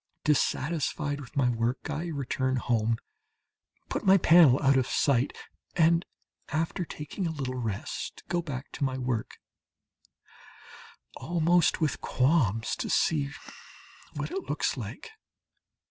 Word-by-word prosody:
Dissatisfied 150 0 0
with 135 - -12
my 135 -3 +3
work 120 +2 -2
I 160 - -3
return 130 -4 -1
home, 115 -2 +1 0.9
put - - -3
my 195 -1 +6
panel 160 -7 +6
out 135 0 +5
of 130 -1 +2
sight, 135 -3 +2 0.4
and 165 +1 +4 0.5
after 160 +4 -1
taking 160 +5 -5
a - - -2
little 135 -5 -4
rest, 115 -6 -4
go 175 +1 0
back 140 -4 -6
to - - -4
my 130 -1 0
work, 125 -3 -3 1.8
almost 175 +1 +2
with 155 -3 0
qualms 125 - +1
to - - -3
see 145 -3 +2 0.9
what - - -4
it 385 +1 -5
looks - - 0
like. 460 - -7
145 Hz, 125 wpm, -28 LUFS, 130-165 Hz, 1.8 s, my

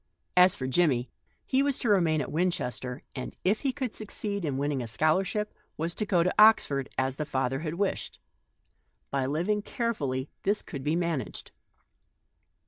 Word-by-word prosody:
As 180 +1 +6
for 130 - -4
Jimmie, 130 -3 +2 0.3
he 265 0 +2
was 280 -1 +1
to 235 - -1
remain 165 -6 +3
at 130 - -5
Winchester, 130 -7 -1
and, 130 - -6
if 205 +4 +2
he 275 - 0
could 260 -4 -3
succeed 205 -2 -3
in 140 -4 -1
winning 140 -1 0
a 120 - -4
scholarship, 185 - +1 0.2
was 165 +2 -1
to 215 - -3
go 175 -4 +3
to 180 - +1
Oxford 145 -11 +5
as 130 0 0
the 150 - -1
father 135 -2 -1
had 155 +1 -3
wished. 195 +2 -2 0.9
By 135 -2 0
living 175 +9 0
very - - -16
carefully 145 - -1
this 205 +2 +1
could 140 -4 -7
be 150 +3 +1
managed. 170 -5 -2
165 Hz, 170 wpm, -28 LUFS, 135-205 Hz, 0.9 s, As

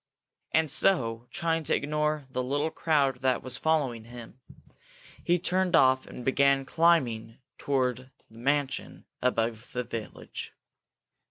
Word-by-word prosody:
And 160 0 +3
so, 120 -8 +2
trying 165 -3 -1
to - - +3
ignore 150 0 -1
the 130 - -1
little 145 +5 -1
crowd 140 -6 +1
that 130 -2 +1
was 130 0 -4
following 135 -8 0
him, 120 +1 -11 0.8
he 175 - +2
turned 185 0 +1
off 130 -3 +4
and 125 - -9
began 135 0 +3
climbing 125 -10 +1 0.2
toward 130 -2 -1 0.2
the - - -24
mansion 135 +3 -2 0.2
above 115 -2 -1
the 125 - -2
village. 115 -2 -7
135 Hz, 125 wpm, -28 LUFS, 125-155 Hz, 0.8 s, off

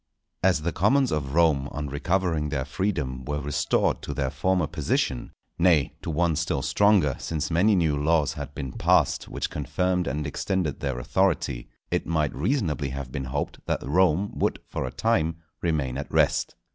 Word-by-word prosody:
_ 95 - +6
As 80 -5 0
the 85 - 0
commons 125 - +3
of 70 -2 -2
Rome 75 -5 +3
on 75 - -4
recovering 80 +1 0
their 70 -3 -2
freedom 70 -5 -2
were 75 +3 -2
restored 75 0 0
to - - -5
their 65 -3 -1
former 95 -2 +1
position—nay, 75 +1 0
to - - -5
one 80 0 +1
still 80 -2 -1
stronger 100 -10 +3
since 80 0 -3
many 100 +6 +4
new 80 -5 +2
laws 75 +1 +2
had 70 0 -7
been 70 -4 -4
passed - - +2
which - - -4
confirmed 90 +5 -1
and 75 +2 -2
extended 80 +1 -2
their 70 -3 -2
authority,—it 80 -3 -1
might 80 -3 0
reasonably 80 - 0
have 70 -1 -6
been 65 0 -4
hoped 70 +3 -4
that - - -1
Rome 90 +4 +3
would - - +1
for - - -3
a - - -5
time 80 - +1 0.3
remain 70 -6 -1
at 70 - -6
rest. - - +2
75 Hz, 170 wpm, -26 LUFS, 70-90 Hz, 0.3 s, _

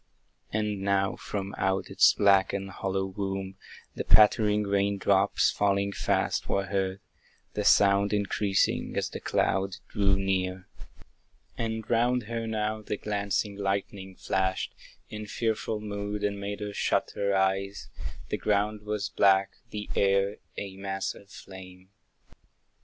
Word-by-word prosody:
And 105 -2 -1
now 95 0 +1
from 100 -1 -5
out 95 0 0
its - - +6
black 100 -2 +4
and 95 0 -3
hollow 95 +1 -2
womb, 95 0 -4 0.4
The - - -4
pattering 105 0 +5
rain 100 0 +1
drops, 95 0 +3
falling 100 0 +1
fast, - - 0
were 100 0 +1
heard, 95 0 -2 0.5
The 105 - -2
sound 100 0 +5
increasing 100 -1 0
as - - 0
the - - -6
cloud 95 +1 0
drew 100 -2 +2
near. 95 -1 -1 0.9
And 110 -1 -3
round 120 +1 +2
her 115 +1 -4
now 110 0 -1
the 105 0 -4
glancing 100 0 -1
lightning 95 -1 -3
flashed 95 +1 -1 0.4
In 105 0 -6
fearful 110 0 -1
mood, 105 0 -4
and 100 -1 -1
made 100 +1 -4
her 105 0 -4
shut - - 0
her 100 0 0
eyes; 95 +1 0 0.4
The - - -1
ground 105 0 0
was 105 -1 -2
black, 95 0 +4 0.2
the 105 -1 -5
air 100 +1 +2 0.2
a 95 -1 -6
mass 95 0 -3
of 100 - -16
flame. 95 -1 -12
100 Hz, 135 wpm, -28 LUFS, 95-105 Hz, 0.9 s, its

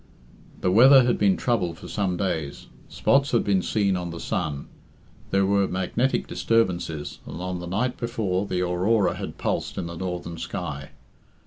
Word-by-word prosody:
The 90 - +2
weather 130 +6 +8
had 120 0 +1
been 100 -2 +3
troubled 90 -9 0
for - - -10
some 95 -4 -1
days. 80 -7 -3 0.2
Spots 140 -1 +2
had 120 - +3
been 100 -2 +2
seen 100 -1 +1
on 90 -1 -3
the 85 0 -7
sun. 70 -3 -3 0.6
There 95 0 +2
were 100 0 +2
magnetic 95 +8 0
disturbances, 90 -9 -1
and - - -7
on 90 0 -3
the 90 - -7
night 120 +8 -1
before 105 -5 -1
the 90 -2 -1
aurora 95 +4 +2
had - - -6
pulsed - - -2
in - - -2
the 85 0 -6
northern 85 -2 -5
sky. 75 -7 -5
95 Hz, 165 wpm, -25 LUFS, 85-110 Hz, 0.6 s, weather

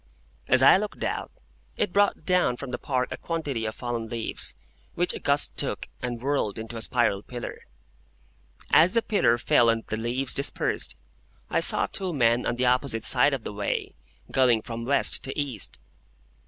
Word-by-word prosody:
As 130 +1 +4
I 135 - +8
looked 210 +1 -5
out, - - -3 0.5
it 205 -4 -1
brought 205 0 +2
down 180 -9 +2
from 140 -1 -7
the - - -4
Park 125 -2 -2
a - - -4
quantity 145 -9 -3
of 110 - -4
fallen 120 -2 -4
leaves, 115 -1 -3 0.4
which 175 +1 +4
a - - -6
gust 140 +1 +1
took, - - -1
and 120 -2 -4
whirled 130 -5 -1
into 110 +1 -7
a 115 - -5
spiral 110 -4 0
pillar. 120 +2 -8 1.0
As 170 +6 +5
the 230 - +3
pillar 160 - +2
fell 120 -1 +3
and 115 0 0
the 110 - -4
leaves 120 +4 -2
dispersed, 140 - -1 0.6
I - - +2
saw - - +5
two 190 -3 -3
men 120 -3 +2
on - - -1
the 125 +1 0
opposite 125 -2 +1
side 135 +2 +4
of 125 - -8
the - - -6
way, 100 0 -3 0.4
going 125 -4 +3
from 115 0 -6
West 140 +3 +2
to 135 - -4
East. 135 -8 -2
125 Hz, 180 wpm, -26 LUFS, 115-145 Hz, 1.0 s, I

